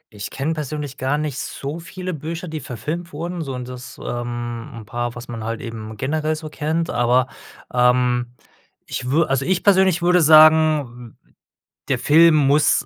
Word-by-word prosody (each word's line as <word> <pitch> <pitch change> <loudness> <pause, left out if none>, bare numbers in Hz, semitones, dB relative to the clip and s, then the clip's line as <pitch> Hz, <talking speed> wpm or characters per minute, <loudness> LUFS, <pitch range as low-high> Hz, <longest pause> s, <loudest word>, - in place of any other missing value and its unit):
Ich 100 0 -6
kenne 145 +4 -2
persönlich 150 -2 -5
gar 135 +3 0
nicht 150 -3 -3
so 145 +4 -5
viele 185 +2 -6
Bücher, 165 +3 -5
die 155 -1 -5
verfilmt 150 +8 -6
wurden, 170 +3 -4
sondern 130 -4 -5
das, 125 -1 -9
ähm, 120 -1 -4
'n 115 -2 -9
paar, 120 +2 -4
was 120 0 -9
man 115 -2 -6
halt 115 +1 -3
eben 110 -2 -7
generell 155 +4 -1
so 155 0 -7
kennt, 160 +2 -2
aber 125 +2 +2 0.5
ähm, 125 0 +2 0.6
ich 125 - -5
wür 155 +3 +3
also 135 0 +1
ich 180 +3 0
persönlich 190 -3 +4
würde 180 0 +4
sagen, 155 -6 +5
w - - -32
w - - -31 0.6
der - - +2
Film 160 +2 +6
muss 145 +1 +3
145 Hz, 175 wpm, -21 LUFS, 120-160 Hz, 0.6 s, Film